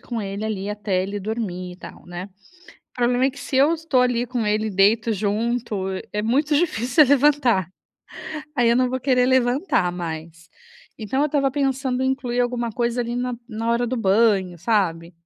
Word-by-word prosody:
com 235 -2 -5
ele, 200 +1 -4
ali, 205 -2 -3
até 205 -3 -1
ele 200 +1 -4
dormir, 190 -4 -4
e 180 - -13
tal, - - -12
né. 175 +2 -7 0.6
O - - -71
problema 245 +1 +2
é 270 - +3
que 280 - -12
se 275 - -5
eu 285 +5 +5
estou 315 -6 +1
ali 245 -1 +1
com 240 -3 -2
ele, 215 +1 0
deito 215 +3 +3
junto, 215 0 -1 0.3
é 210 - -1
muito 285 +7 +1
difícil 295 -3 +3
eu 265 - -4
levantar. 270 - +3 0.9
Aí 240 -3 +3
eu 235 - +4
não 255 0 +2
vou 260 +1 -2
querer 250 -1 +2
levantar 255 - +2
mais. 165 -1 -7 0.5
Então 230 +5 -2
eu - - +3
estava 275 -2 +1
pensando 265 -2 -1
em 260 - +1
incluir 255 -2 -1
alguma 245 -1 -1
coisa, 240 +1 -1
ali, 235 +1 -3
na 250 0 -2
na 225 0 -3
hora 235 +1 +1
do 255 +2 -2
banho, 195 -4 +2
sabe. 175 -4 0
235 Hz, 190 wpm, -22 LUFS, 200-255 Hz, 0.9 s, eu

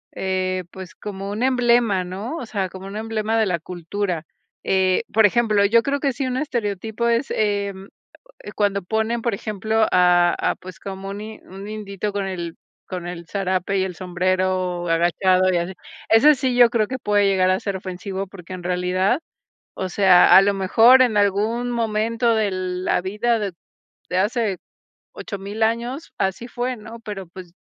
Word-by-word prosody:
eh, 185 -1 -1
pues 190 -2 -10
como 195 -1 -6
un 215 +4 -3
emblema, 240 -6 +3
¿no? 200 - -5
O 245 - -6
sea, 195 -4 -2
como 190 +1 -10
un 200 +2 -6
emblema 220 0 -1
de 220 - +3
la 180 -4 -1
cultura, 175 +1 -4 0.4
eh, 190 +2 +2
por 220 -1 +6
ejemplo, 215 -2 +2
yo 230 +3 +4
creo 280 0 -1
que 275 -2 0
sí 270 - -3
un 255 0 -2
estereotipo 225 -4 -2
es, 235 +3 +1
em, 200 -2 -1 0.5
eh, - - -9
cuando 200 -2 0
ponen, 220 +4 -1
por 235 - 0
ejemplo, 215 +1 0
a 175 -1 +4
a - - -1
pues 185 -1 -12
como 195 0 -6
un 200 - -6
in 215 0 -8
un 195 +2 -9
indito 210 -1 -4
con 200 -1 -2
el 175 -3 -5 0.3
con 180 -2 -6
el 175 -1 -6
zarape 190 0 -1
y 190 - +1
el 185 -1 -5
sombrero 185 0 -1
agachado 185 +3 +3
y 175 - +2
así. 175 +2 -3 0.3
Eso 275 +8 +6
sí, 255 -2 -1
yo 240 -1 +7
creo 220 -3 +1
que 260 - -4
puede 205 -3 +2
llegar 185 -1 +3
a 185 - +1
ser 200 -1 -3
ofensivo 190 +1 -5
porque 185 -2 -12
en 180 -1 -7
realidad, 180 - +1 0.6
o 190 - -3
sea, 185 -1 +6
a - - +9
lo 200 0 +2
mejor 225 +7 +6
en 235 -5 +3
algún 215 +5 +1
momento 230 0 0
de 215 -2 +1
la 185 -1 -1
vida 210 +5 0
de 200 -4 -3 0.6
de 180 - -1
hace 210 0 0 0.6
8000 200 +2 -6
años, 240 +7 -2
así 190 +5 -1
fue, 245 +1 -3
¿no? 225 +1 -11
Pero 205 -4 -7
pues 175 0 -12
200 Hz, 180 wpm, -22 LUFS, 185-225 Hz, 0.6 s, a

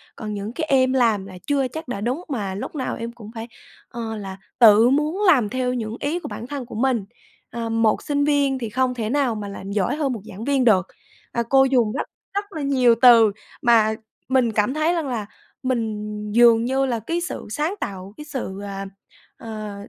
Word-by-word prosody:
còn 215 -2 -5
những 205 +3 -5
cái 315 +1 -2
em 260 -1 +4
làm 225 -6 +2
là 185 -2 -10
chưa 275 -2 +1
chắc 315 +3 -7
đã 200 -5 -4
đúng 255 +10 -2
mà 205 -8 -3
lúc 205 - -6
nào 260 -3 -2
em 230 0 -5
cũng 225 -2 -12
phải, 225 +1 -6 0.4
ờ, 225 -2 -5
là 195 -2 -7 0.2
tự 225 +1 +7
muốn 305 +8 +1
làm 250 - +5
theo 255 0 -1
những 225 -2 -4
ý 310 +5 -1
của - - -7
bản 235 - -7
thân 275 -2 -5
của 235 - -10
mình. 235 -3 +1 0.4
Ờ, 230 -1 -4
một 225 -1 +2
sinh 285 -1 0
viên 280 -2 +2
thì 230 -3 -4
không 255 +2 0
thể 225 -3 -3
nào 265 -3 +1
mà 205 -1 -5
làm 195 0 -7
giỏi 200 +4 0
hơn 280 -4 -1
một 220 - -6
giảng 195 +4 -8
viên 275 -2 +2
được". 190 -6 +4 0.4
Ờ, 235 - -1
cô 270 0 +6
dùng 245 -5 +2
rất - - -3 0.3
rất 405 +1 -1
là 315 - -5
nhiều 255 -4 +4
từ 230 -4 +8 0.3
mà 225 -4 +4 0.3
mình 255 -3 +3
cảm 210 +4 +1
thấy 310 +3 +1
rằng 330 -5 -1
là 225 -5 -3 0.4
mình 230 -4 -1 0.3
dường 235 0 +5
như 265 +2 +1
là 240 -3 -1
cái 335 - -2
sự 360 - -5
sáng 305 - -1
tạo, 195 +1 -6
cái 300 - -8
sự, 250 -9 -5
à, 195 -1 -5 0.5
ờ, 215 -2 -7
240 Hz, 215 wpm, -22 LUFS, 215-270 Hz, 0.5 s, từ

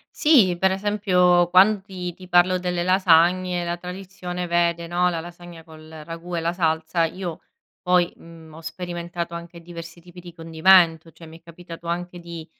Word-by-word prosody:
Sì, 230 - +4
per 190 +2 +2
esempio 185 -3 +2
quan 195 +3 +5
ti 185 -3 -7
ti 185 +2 -14
parlo 180 +1 +3
delle 180 -1 -2
lasagne 180 0 +3
la 170 0 -3
tradizione 180 0 -7
vede, 170 0 0
no, 175 +1 +1
la 165 -2 -3
lasagna 175 -1 -12
col 155 -1 -15
ragù 170 +2 -7
e 165 - -2
la 165 +1 -1
salsa, 160 -1 0
io 175 0 -6 0.4
poi, 180 -1 +2
mhmm, 165 -1 -15
ho 160 - -11
sperimentato 170 +1 -6
anche 170 0 -10
diversi 170 0 -11
tipi 175 +1 -14
di 175 -1 -12
condimento, 165 0 +3
cioè 165 - -14
mi 160 +1 -13
è - - -39
capitato 170 0 -12
anche 175 +1 -4
di, 170 -2 -9
175 Hz, 170 wpm, -22 LUFS, 165-180 Hz, 0.4 s, quan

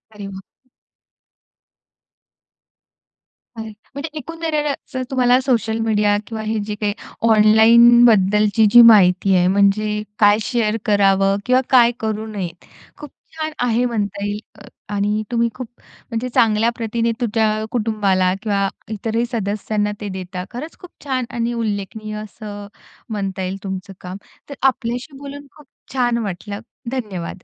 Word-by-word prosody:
अरे 205 -1 -7
वाह! 195 +6 -13 2.9
बरं. 220 0 -6 0.2
म्हणजे 280 +3 -5
एकंदरच 305 -3 -3 0.2
तुम्हाला 250 -1 +4
सोशल 230 -4 0
मीडिया 210 -2 +2
किंवा 220 -1 -5
हे 220 +1 -2
जे 210 0 -4
काही 205 -1 0 0.4
ऑनलाईनबद्दलची 220 -1 +5
जी 240 - +9
माहिती 195 -4 +6
आहे, 180 0 +3
म्हणजे 205 +2 +2 0.2
काय 205 -1 +6
शेअर 225 -1 0
करावं, 195 -1 +3
किंवा 255 +1 +3
काय 240 -2 +6
करू 220 0 -3
नये, 200 -5 -4 0.5
खूप 295 - -10 0.3
छान 315 0 -3 0.2
आहे 240 +1 +1
म्हणता 205 -4 -2
येईल 205 0 -3 0.2
अ, 205 - -13 0.3
आणि 205 +1 0
तुम्ही 235 -1 +1
खूप 255 -2 -6
म्हणजे 235 +1 -7
चांगल्या 225 0 +3
प्रतीने 230 0 -1
तुमच्या 220 -1 0
कुटुंबाला 205 -5 +1
किंवा 200 -3 0 0.2
इतरही 225 +2 -1
सदस्यांना 210 -1 -2
ते 205 - -4
देता. 185 -1 -6
खरंच 285 +7 -8
खूप 360 - -13
छान 260 -3 -2
आणि 240 0 -2
उल्लेखनीय 215 -1 -4
असं 205 -1 -9 0.4
म्हणता 195 -3 -3
येईल 185 +1 -3
तुमचं 190 0 -6
काम. 180 +1 -7 0.3
तर 280 - -7
आपल्याशी 250 +2 -3
बोलून 285 +1 -9
खूप 300 -2 -17 0.3
छान 245 -2 +1
वाटलं, 200 +1 -5 0.3
धन्यवाद! 195 -8 -5
215 Hz, 130 wpm, -19 LUFS, 205-240 Hz, 2.9 s, जी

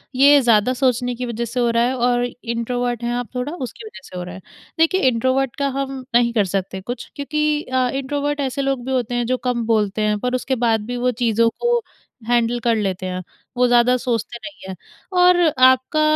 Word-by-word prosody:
ये 285 +2 +7
ज़्यादा 235 0 +3
सोचने 250 -1 0
की 250 +1 -4
वज़ह 235 0 -3
से 245 +2 -4
हो 240 -1 +2
रहा 230 0 +2
है 255 +2 0
और 245 0 +1
इंट्रोवर्ट 245 0 -3
हैं 240 0 -1
आप 245 -1 -3
थोड़ा 250 +5 -3
उसकी 260 - -7
वज़ह 430 - -10
से 180 - -8
हो 180 - -4
रहा 180 +1 -8
है। 190 - -10 0.4
देखिए 350 +4 +3
इंट्रोवर्ट 260 +2 0
का 280 - -1
हम 270 -1 -4
नहीं 235 -1 +3
कर 210 -4 +2
सकते 190 0 -3
कुछ 240 +5 -6
क्योंकि 300 +1 0
अ, 255 -1 0
इंट्रोवर्ट 285 +2 -2
ऐसे 275 0 -1
लोग 270 -2 -1
भी 265 - -3
होते 245 -2 -1
हैं 240 0 0
जो 255 +2 0
कम 235 -2 -1
बोलते 215 -2 +1
हैं 210 0 +1
पर 250 +2 -1
उसके 260 +1 -1
बाद 225 -2 +2
भी 245 +1 -4
वो 250 +1 +1
चीज़ों 230 0 +3
को 475 0 +2 0.5
हैंडल 240 0 +1
कर 235 -1 +3
लेते 190 -3 -2
हैं। 185 0 -3 0.4
वो 250 - +4
ज़्यादा 245 +1 +4
सोचते 235 -1 -2
नहीं 295 -11 -10
हैं 190 - -5 0.4
और 360 0 +6 0.3
आपका 260 +4 +3
245 Hz, 215 wpm, -20 LUFS, 230-265 Hz, 0.5 s, ये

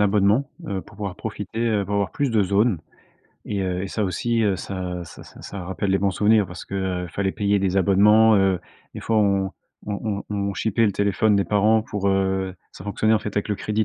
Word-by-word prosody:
abonnement, 105 +5 +3 0.2
heu, 95 -1 -2
pour 105 - -17
pouvoir 100 -4 -5
profiter, 115 - -5
heu, 105 -3 +1
pour 100 - -3
avoir 100 -4 0
plus 140 - -1
de 110 -3 +3
zones, 100 0 +2 0.7
et 100 -2 -2
heu, 90 0 -2
et 100 - -4
ça 105 +1 -1
aussi, 115 +5 0
heu, 100 -3 +2
ça 90 -2 -5
ça - - -12
ça - - -15
ça 100 -3 -7
rappelle 95 +1 -2
les 95 - +3
bons 100 +1 +1
souvenirs. 105 +1 +3
Parce 90 +1 -9
que, 100 - -8 0.3
heu, - - -7
fallait 95 +3 -1
payer 100 -1 +1
des 95 -1 0
abonnements, 105 +3 +5
heu. 95 -2 +2 0.3
Des - - -6
fois, 115 - 0
on 100 -2 +2 0.4
on 105 0 -3
on 105 - -4
on 100 -1 -1
chipait 115 +1 +1
le 100 - +2
téléphone 100 +1 +2
des 100 - +2
parents 105 +2 +3
pour 105 -3 -2
heu, 95 -1 0 0.2
ça 95 - -11
fonctionnait, 110 +2 +1
en - - +3
fait, 105 -1 -6
avec 100 - 0
le 105 - +1
crédit 105 +2 -1
100 Hz, 230 wpm, -23 LUFS, 95-105 Hz, 0.7 s, abonnements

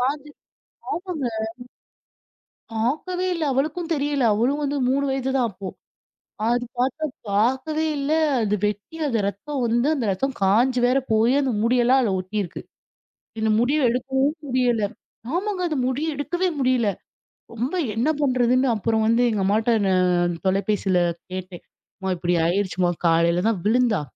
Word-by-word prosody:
காஞ்சி 295 +1 -7 0.6
ஆமங்க! 345 -7 -3 1.5
பாக்கவே 305 +11 -1
இல்ல. 335 -2 -2
அவளுக்கும் 310 +6 -1
தெரியல. 285 -1 0
அவளும் 255 +7 +1
வந்து 285 0 -1
3 275 +2 +1
வயது 265 0 -1
தான் 250 - +2
அப்போ. 195 0 -7 0.8
அது 240 +1 +1
பாத்தா 265 +5 0 0.3
பாக்கவே 265 +9 +1
இல்ல. 280 +1 -2 0.3
அது 210 -1 +1
வெட்டி 210 - -5
அது 235 -4 0
ரத்தம் 270 +8 -5
வந்து, 235 +4 +1
அந்த 255 - -2
ரத்தம் 270 +7 -2
காஞ்சு 245 +6 +3
வேற 255 +2 +3
போயி, 225 +3 +4
அந்த 265 -2 0
முடியெல்லாம் 245 +2 +4
அதுல 215 -5 +1
ஒட்டிருக்கு. 185 -1 -4 0.8
இந்த 220 0 +2
முடிய 270 +6 +2
எடுக்கவும் 265 +4 0
முடியல. 245 -4 +1 0.5
ஆமாங்க. 380 0 -2
அந்த 305 - -1
முடிய 300 +5 -1
எடுக்கவே 350 +6 -1
முடியல. 255 -4 +2 0.6
ரொம்ப 245 +9 -2 0.2
என்ன 240 +7 +1
பண்றதுன்னு 255 -1 +2
அப்புறம் 220 +1 0
வந்து 230 +2 +3
எங்க 210 - -1
அம்மாட்ட 220 +4 +2 0.2
நான் 180 -2 +2
தொலைபேசில 195 0 +1 0.3
கேட்டேன். 185 -1 -7 0.4
"அம்மா 190 -1 -2
இப்பிடி 175 +1 0
ஆயிடுச்சுமா! 185 0 0 0.2
காலையில 170 +2 +3
தான் 215 - -1
விழுந்தா! 230 -3 +2
245 Hz, 135 wpm, -23 LUFS, 205-275 Hz, 1.5 s, போயி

